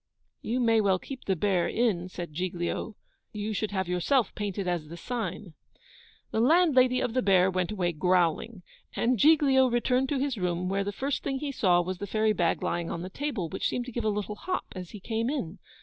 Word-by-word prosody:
'You 240 +3 -1
may 230 -2 +4
well 195 -2 +3
keep 265 +7 -9
the 190 - +1
Bear 185 0 +1
Inn,' 195 -7 0
said 175 -3 -7
Giglio. 180 +5 -3 0.4
'You 210 +1 -3
should 215 +1 -1
have 190 -3 -2
yourself 185 +7 +1
painted 200 -2 -3
as 175 -4 -1
the 170 +2 -9
sign.' 210 -5 -4 0.8
The - - 0
landlady 260 -3 +4
of 225 - -1
the 255 - +2
Bear 190 -3 +4
went 185 0 -1
away 180 -4 0
GROWLING. 180 +4 +1 0.3
And 240 -1 +1
Giglio 280 -3 +5
returned 250 +2 +1
to 285 - 0
his 270 -2 -1
room, 180 0 -1
where 195 +1 0
the 200 - -3
first 270 +7 -2
thing 270 - -2
he 285 +1 -3
saw 180 -9 +3
was 185 0 -4
the 205 - -4
fairy 215 +2 +2
bag 175 -4 0
lying 170 -1 -1
on 170 - -4
the 185 - -7
table, 260 - -3
which - - -2
seemed 245 - -2
to 250 - -7
give 240 0 -3
a 215 - +2
little 210 0 -2
hop 365 - -3
as 180 -2 -7
he 210 - -9
came 225 +4 -2
in. 205 - -4
205 Hz, 210 wpm, -28 LUFS, 180-250 Hz, 0.8 s, Giglio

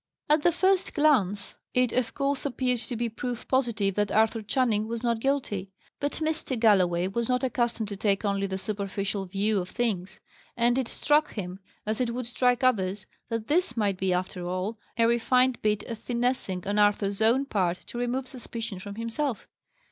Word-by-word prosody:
At 300 +1 +4
the 345 - +4
first 375 +2 +2
glance, 210 - +2 0.2
it 250 -2 +3
of 250 -2 0
course 280 -1 0
appeared 250 -3 0
to 245 +1 -4
be 235 +1 -1
proof 240 +1 -5
positive 235 -7 +1
that 205 0 0
Arthur 220 +1 +3
Channing 220 -1 +1
was 230 +1 -4
not 235 -2 +1
guilty. 225 -8 -1 0.3
But 285 0 -1
Mr. 315 -4 -2
Galloway 185 -5 +4
was 230 +5 -2
not 250 +1 +1
accustomed 240 -3 0
to 200 - -4
take 200 0 +1
only 200 -1 0
the 190 0 -3
superficial 200 -1 -3
view 200 +2 +1
of 180 0 -4
things: 200 -6 -2 0.4
and 240 +2 +3
it 260 - -1
struck 300 +4 +2
him, 185 -3 -5 0.3
as 215 +3 -1
it 235 -1 -1
would 250 -1 -3
strike 245 +1 +1
others, 200 -5 +1 0.2
that 230 -2 -2
this 305 -6 +1
might 200 -4 +1
be, 190 -1 +1
after 180 0 -2
all, 185 +5 -3 0.2
a 230 - +4
refined 250 +2 +3
bit 210 -1 +1
of 230 -2 -6
finessing 240 -7 -1
on 205 +1 0
Arthur's 205 0 +2
own 240 +5 +4
part 185 -8 0
to 240 - -6
remove 250 +2 -1
suspicion 230 -6 -6
from 200 +1 -8
himself. 230 +3 -2
230 Hz, 185 wpm, -27 LUFS, 200-250 Hz, 0.4 s, At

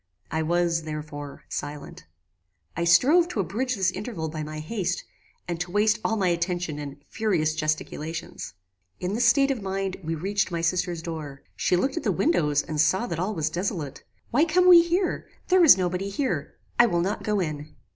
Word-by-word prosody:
I 160 - 0
was, 170 +1 +1
therefore, 150 -2 -7
silent. 145 0 -6 0.7
I 170 - -1
strove 290 - +5
to 295 - -4
abridge 245 +7 -1
this 190 -2 +1
interval 185 -7 -5
by 155 0 -5
my 155 0 -6
haste, 180 +5 -2 0.4
and 170 -1 -3
to 180 +1 -3
waste 210 +3 +2
all 225 - 0
my 190 -3 +2
attention 175 -3 -1
in 145 -1 -7
furious 180 -9 0
gesticulations. 155 - -4 0.4
"In 180 +2 -2
this 235 +3 +1
state 275 +4 +4
of 255 -5 -3
mind 195 -1 -3
we 165 +1 -2
reached 195 +4 -1
my 170 -2 -2
sister's 175 0 -1
door. 155 -5 -6
She - - +1
looked 265 - 0
at - - -2
the - - +1
windows 150 - +2
and 155 -1 0
saw 190 +9 +2
that 170 -7 -4
all 200 +4 -1
was 155 -1 -1
desolate 170 -6 -3 0.3
"Why 270 +6 +4
come 360 +3 +3
we 350 -2 +10
here? 350 +2 -1 0.2
There 370 -1 +6
is 310 - +9
no 185 -1 +1
body 185 +3 -3
here. 260 +7 -2 0.2
I 240 - +8
will 175 -5 +1
not 195 +4 -1
go 210 -1 0
in." 155 -3 -4
180 Hz, 190 wpm, -25 LUFS, 155-215 Hz, 0.7 s, we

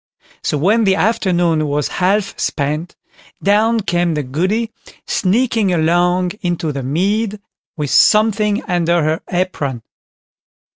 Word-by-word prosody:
So 150 - -1
when 210 +9 +2
the 190 -1 +3
afternoon 175 -8 +1
was 145 0 -1
half 195 +2 +1
spent, 150 +4 -2 0.5
down 220 +3 +3
came 175 -2 0
the 150 - -1
Goody 190 - -1 0.3
sneaking 220 0 +1
along 175 +2 +2
into 175 -4 -2
the 140 -1 -4
mead, 200 - -1 0.4
with 150 -3 -3
something 215 -1 +3
under 175 -2 +1
her 155 +1 0
apron. 150 -9 -2
180 Hz, 115 wpm, -17 LUFS, 160-210 Hz, 0.5 s, the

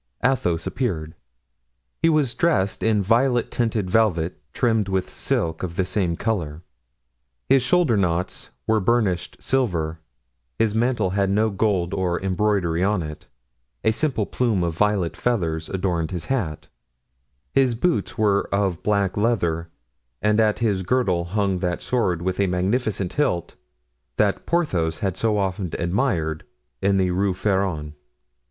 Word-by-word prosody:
Athos 90 -11 +1
appeared. 80 - -2 0.9
He 165 - +4
was 150 -6 +2
dressed 100 - +1
in 110 -2 +2
violet 120 +4 +2
tinted 115 -5 0
velvet, 90 -6 +1
trimmed 110 -1 +1
with 95 -1 0
silk 80 -1 -2
of 85 -2 -4
the 95 0 +1
same 90 -4 0
color. 85 -8 -2 0.9
His 135 - +5
shoulder 165 -2 +3
knots 90 -2 -1 0.2
were 110 - +3
of 95 - -6
burnished 105 -7 +1
silver, 85 -12 0 0.6
his 110 -2 +2
mantle 110 -4 +1
had 100 0 +1
no 110 +2 +2
gold 95 -4 0
nor 95 -3 0
embroidery 95 -3 0
on 100 -3 +1
it; 75 0 -8 0.6
a 110 - +4
simple 120 -3 0
plume 110 -7 0
of 85 -2 -1
violet 100 -3 +1
feathers 80 -10 -1
adorned 90 -4 -1
his 90 -3 -4
hat; 95 - -2 0.9
his 130 -3 +3
boots 170 +3 0
were 100 -2 +2
of 100 -4 0
black 100 -3 +1
leather, 85 -7 0 0.5
and 105 +1 +2
at 110 -1 +3
his 105 -5 0
girdle 95 -5 +1
hung 95 0 0
that 90 -1 -1
sword 90 -9 0
with 95 +1 -2
a 100 - +3
magnificent 95 +2 -1
hilt 115 - 0 0.6
that - - +1
Porthos 95 - 0
had 95 -2 -1
so 110 0 +1
often 95 -2 -1
admired 85 - 0 0.4
in 100 0 +3
the 95 -1 +2
Rue 95 +1 +1
Feron. 95 -7 -1
100 Hz, 145 wpm, -23 LUFS, 85-110 Hz, 0.9 s, His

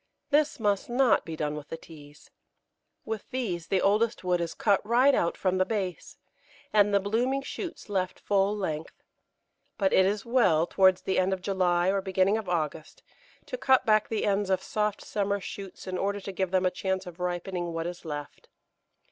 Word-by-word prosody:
This 295 -1 +2
must 205 -1 0
not 250 0 +3
be 165 - -5
done 150 -1 -2
with 150 -1 -8
the 165 - -6
Teas. 150 -3 -15 0.7
With 220 -2 -5
these 200 -11 -3
the 190 - +1
oldest 215 +3 +2
wood 180 -1 +1
is 170 -1 -3
cut 200 -3 +2
right 245 +6 +4
out 170 -8 +1
from 185 -1 0
the - - +5
base, 185 -5 -4 0.6
and 205 -1 +5
the 200 - +4
blooming 245 +7 0
shoots 350 +4 -6
left 190 -3 -2
full 200 +1 +1
length. 160 -6 -5 0.7
But 195 -2 +1
it 190 - +5
is 205 +1 -1
well, 225 -10 +3
towards 185 0 +3
the 190 - +1
end 185 +1 +2
of 190 - -4
July 180 -2 +2
or 195 0 +1
beginning 190 +2 +2
of 210 - -7
August, 155 -2 -3 0.4
to - - -6
cut 265 -1 +4
back 215 -1 +3
the 220 - -1
ends 200 -1 +1
of 190 - +1
soft 210 -1 -1
summer 200 -1 -1
shoots 195 0 -8
in 185 -1 -3
order 200 +1 -1
to 195 0 -6
give 190 -1 -1
them 185 0 +1
a 180 - +3
chance 190 +1 -2
of 175 -1 -10
ripening 175 0 -3
what 165 0 -3
is 175 0 -6
left. 145 -3 -7
190 Hz, 190 wpm, -28 LUFS, 180-210 Hz, 0.7 s, the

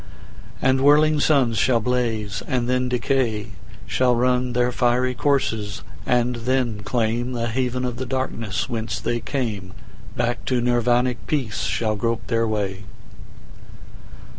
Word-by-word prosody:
And 130 0 +3
whirling 150 +2 +5
suns 130 -8 +3
shall 125 0 +3
blaze 110 -4 -1
and 125 -2 0
then 125 0 +1
decay, 120 -3 0 0.4
Shall 125 -1 +2
run 125 +1 +1
their 125 0 +2
fiery 125 +1 +1
courses 115 -6 0 0.2
and 125 0 +2
then 120 -2 0
claimThe 120 +2 -1
haven 125 +1 -1
of 125 -1 -3
the 130 - -3
darkness 115 -7 -2
whence 115 -1 -3
they 120 0 -1
came; 110 -7 -3 0.4
Back 120 0 -1
to 125 -2 +1
Nirvanic 120 0 +1
peace 120 -10 -1
shall 110 +3 0
grope 115 0 -1
their 115 -1 +1
way. 100 -2 -2
120 Hz, 130 wpm, -23 LUFS, 115-125 Hz, 0.4 s, whirling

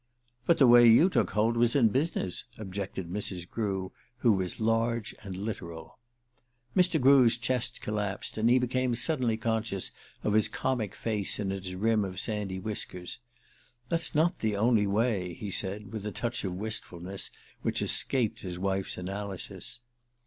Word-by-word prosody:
"But 170 - +5
the 135 - +6
way 120 -1 +8
you 160 +12 +6
took - - +2
hold 110 +2 +1
was 120 +1 +3
in 120 -6 +5
business," 125 - -1
objected 95 -3 -5
Mrs. 90 -2 -3
Grew, 95 -4 -2 0.3
who 120 -2 +4
was 95 -3 -1
large 115 +1 0
and 95 -3 -7
literal. 85 -6 -6 0.8
Mr. 180 -3 +4
Grew's 130 -3 +6
chest 125 0 0
collapsed, 105 -2 -3
and 110 +2 +2
he 125 - +6
became 125 0 +1
suddenly 125 -3 +1
conscious 110 -3 -1 0.3
of 105 - +1
his 110 -1 +4
comic 120 -7 -2
face 105 -4 -1
in 100 -2 -1
its 95 -1 -4
rim 110 +3 +2
of 95 -2 -4
sandy 105 -4 -1
whiskers. 95 -4 -4 0.7
"That's 165 -2 -1
not 160 +3 +2
the 110 -2 0
only 110 0 +3
way," 100 -4 0
he 100 +2 -6
said, 100 +2 -3
with 110 -2 -4
a - - -3
touch 120 +3 -3
of 95 -2 -3
wistfulness 95 -2 -4 0.3
which - - 0
escaped 125 -5 +1
his 90 -2 -5
wife's 95 +1 -1
analysis. 100 +4 -5
110 Hz, 155 wpm, -29 LUFS, 95-120 Hz, 0.8 s, way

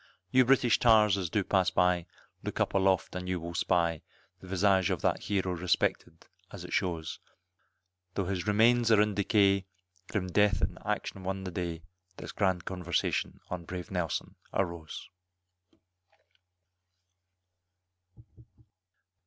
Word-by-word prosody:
You 130 0 +5
British 125 -2 +4
tars 110 -4 +5
as 95 -4 -3
do 105 - 0
pass 95 -1 +2
by, 90 -1 +1 0.3
look - - -5
up - - +1
aloft 95 -2 +1
and 90 0 -4
you 90 -1 -1
will 85 +1 -7
spy, 85 -1 +1 0.4
The 95 - -13
visage 95 -1 +2
of - - -2
that - - 0
hero 95 -2 0
respected 85 -2 -1 0.2
as 90 -3 -9
it - - -8
shows, 85 -4 -2 1.0
Tho' 100 - -1
his 90 0 -3
remains 115 +3 +4
are 110 - +6
in 105 0 +3
decay, 100 -1 +2 0.4
grim 100 -3 -2
Death 105 +1 +3
in 90 +2 -1
action 105 -2 -3
won 95 +1 -3
the 95 - -5
day, 85 -2 -4 0.3
This - - -7
grand 95 -3 0
conversation 90 -2 -2
on 90 -1 -4
brave 90 0 -7
Nelson 90 -3 -3
arose. 85 -4 -3
95 Hz, 135 wpm, -30 LUFS, 90-100 Hz, 1.0 s, are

